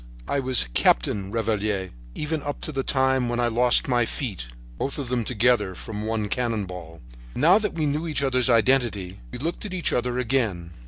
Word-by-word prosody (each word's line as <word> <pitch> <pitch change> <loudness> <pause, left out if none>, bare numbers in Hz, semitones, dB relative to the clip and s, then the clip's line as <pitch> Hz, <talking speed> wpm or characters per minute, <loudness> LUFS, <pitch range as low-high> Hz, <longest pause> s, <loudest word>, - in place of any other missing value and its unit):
I 140 - 0
was 130 - +3
Captain 95 +14 +2
Revaliere 105 -4 -1 0.2
even 155 0 -2
up 145 0 -4
to - - -3
the 135 -2 -1
time 130 -2 +2
when 120 0 -1
I 120 - +2
lost 120 +1 +3
my 120 -2 +2
feet 105 - -4 0.3
—both 140 - -2
of 140 -4 -4
them 125 -2 0
together 110 -4 +1
from 105 +2 -6
one 110 -2 -1
cannon 115 -3 -1
ball." 85 -3 -10 0.3
Now 180 +6 +5
that 210 - -3
we 160 -2 0
knew 150 +3 -1
each 150 -3 -1
other's 130 -2 +2
identity 115 -6 +2
we - - -6
looked 165 +7 -4
at 200 -3 -5
each 175 - 0
other 125 0 0
again. 110 -9 -1
120 Hz, 195 wpm, -24 LUFS, 105-135 Hz, 0.3 s, Now